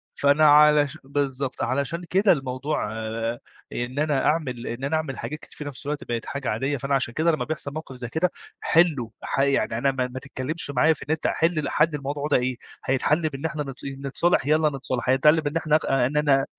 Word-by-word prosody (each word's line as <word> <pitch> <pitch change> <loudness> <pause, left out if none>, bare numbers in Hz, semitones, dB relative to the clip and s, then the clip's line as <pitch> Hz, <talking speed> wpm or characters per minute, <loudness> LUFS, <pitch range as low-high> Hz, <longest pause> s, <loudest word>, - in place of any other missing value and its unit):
فأنا 145 +2 +3
علش 150 -1 +6
بالضبط، 135 -1 -2
علشان 140 +7 -1
كده 195 +2 +4
الموضوع 135 -4 -1
آآ، 115 +1 -3 0.3
إن 125 +4 -3
أنا 150 -3 +1
أعمل 130 -6 0
إن 120 +3 -5
أنا 145 +3 0
أعمل 155 -4 -4
حاجات 150 +1 -5
كتير - - -15
في 150 - -5
نفس 140 0 -8
الوقت 145 0 -3
بقت 120 -1 -3
حاجة 140 -2 -4
عادية، 135 +6 -1
فأنا 135 +2 0
عشان 125 -3 0
كده 165 +2 +2
لمّا 155 - -2
بيحصل 150 -2 -4
موقف 155 -4 -7
زي 120 -2 -6
كده 165 +6 0 0.3
حِلُه 155 -9 +2
ح - - -2
يعني 135 -5 +1
أنا 135 +2 +2
ما 130 -1 -1
ما 130 +1 -7
تتكلمش 140 +3 -4
معايا 155 +5 +4
في - - -9
أنت 160 -1 0
حِل 160 -2 +1
حل 155 +1 +3
الموضوع 145 +1 -3
ده 145 - +3
إيه؟ 125 0 -1 0.3
هيتحل 150 +5 +1
بإن 140 +2 -7
إحنا 150 -2 -2
نت 135 -1 -8
نتصالح؟ 140 +3 0
يالّا 155 0 +4
نتصالح. 125 -1 -2
هيتحل 150 +4 +5
بإن 150 +2 -2
إحنا 155 -1 +2 0.3
إن 150 +4 -1
أنا 140 -2 +3
140 Hz, 205 wpm, -24 LUFS, 130-155 Hz, 0.3 s, علش